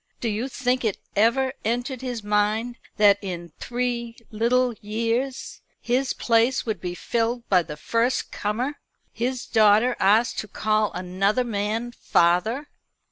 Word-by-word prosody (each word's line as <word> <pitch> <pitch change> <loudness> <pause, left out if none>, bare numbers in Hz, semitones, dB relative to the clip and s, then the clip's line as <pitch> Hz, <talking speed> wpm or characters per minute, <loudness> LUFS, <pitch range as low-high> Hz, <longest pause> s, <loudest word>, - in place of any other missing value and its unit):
Do 235 - -1
you 220 +4 -2
think 255 -1 0
it 215 -4 0 0.2
ever 255 +5 +3
entered 245 +3 -2
his 245 -4 -4
mind 210 +3 0 0.2
that 205 -1 +5
in 175 -4 -6
three 240 -1 -3
little 240 +3 +2
years 230 +5 -2 0.2
his 255 +2 0
place 235 +3 +2
would 220 -2 -3
be 180 -1 -4
filled 235 +4 -1
by 185 -2 +5
the 150 -3 -8
first 230 +10 0
comer 245 +8 -2 0.3
his 250 +2 -2
daughter 220 +2 +4
asked 215 +5 +3
to 215 - -5
call 215 +1 0
another 190 +6 0
man 225 +1 -2
father?" 220 - +1
230 Hz, 135 wpm, -24 LUFS, 210-245 Hz, 0.3 s, that